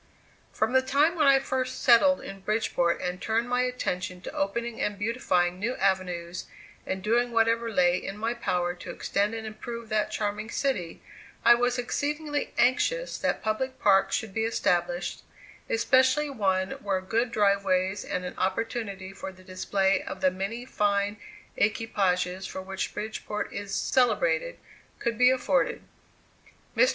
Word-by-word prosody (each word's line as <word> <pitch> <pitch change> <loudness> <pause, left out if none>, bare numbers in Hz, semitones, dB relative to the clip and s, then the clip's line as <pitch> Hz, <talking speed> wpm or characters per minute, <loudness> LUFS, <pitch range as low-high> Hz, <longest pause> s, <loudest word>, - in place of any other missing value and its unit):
From - - 0
the 260 - +6
time 280 +5 +3
when 310 -4 +2
I 275 -1 +7
first 260 -1 -2
settled 275 +3 +6
in 195 - -8
Bridgeport 190 -4 0
and 180 0 -3
turned 225 +2 0
my 245 0 +1
attention 185 -8 -2
to - - -7
opening 230 +4 -2
and 205 -1 -1
beautifying 185 -5 0
new 235 +5 -1
avenues, 185 -2 -1 0.4
and 190 0 -3
doing 240 +3 +2
whatever 230 0 +2
lay 180 -2 +3
in 195 - -5
my 225 +2 -1
power 180 -7 -1
to 180 0 -10
extend 205 +5 -1
and 220 -1 -5
improve 230 +1 -7
that 215 -1 +1
charming 210 +1 -3
city, 215 - -2 0.4
I 240 - +9
was 245 +1 +1
exceedingly 290 +4 -2
anxious - - +2
that - - -1
public 260 +5 -1
parks 195 -2 +4
should 220 -3 -3
be 220 - 0
established, 175 -5 0 0.5
especially 260 +5 +3
one 190 -5 0
where 195 -2 0
good 225 +6 0
drive 200 -3 +3
ways, 190 +1 +1
and 180 0 -3
an 180 - -5
opportunity 195 -1 -2
for 195 0 -7
the 185 0 -17
display 190 +1 0
of - - -7
the 185 -1 +4
many 200 +6 -4
fine 205 -3 0 0.4
equipages 190 -4 0
for 190 - -6
which 195 0 -4
Bridgeport 210 0 -4
is 200 -1 -4
celebrated, - - +1 0.4
could 235 -1 -2
be 250 0 +7
afforded. 260 +1 +1 0.9
Mr. - - +5
215 Hz, 155 wpm, -27 LUFS, 190-245 Hz, 0.9 s, I